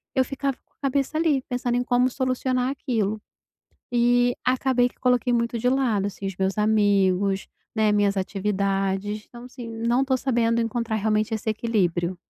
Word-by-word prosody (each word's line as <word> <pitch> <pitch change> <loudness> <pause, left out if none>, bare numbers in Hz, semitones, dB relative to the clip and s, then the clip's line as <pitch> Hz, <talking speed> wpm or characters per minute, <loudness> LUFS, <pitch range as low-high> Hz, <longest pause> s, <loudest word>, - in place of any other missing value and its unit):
eu 260 - +4
ficava 275 0 -3
com - - -47
a - - -48
cabeça 275 +3 0
ali 310 -5 +2
pensando 245 -1 -1
em 245 - +1
como 250 +1 +2
solucionar 255 0 -1
aquilo, 220 -7 -2 0.7
e 245 0 +3
acabei 255 -1 +2
que - - -26
coloquei 250 -1 +2
muito 235 0 0
de 245 +2 +1
lado, 235 -7 +1
assim, 195 0 -5
os 195 - -4
meus 190 +2 -1
amigos, 200 -2 +2 0.3
né, 215 -1 +3
minhas 205 -1 +2
atividades, 195 +1 -1
então, 240 0 -12
assim, 250 -1 -9
não 235 +3 0
tô 265 - +1
sabendo 235 -3 +1
encontrar 230 -1 -1
realmente 215 +1 0
esse 220 0 -3
equilíbrio. 185 -6 0
230 Hz, 165 wpm, -24 LUFS, 205-250 Hz, 0.7 s, eu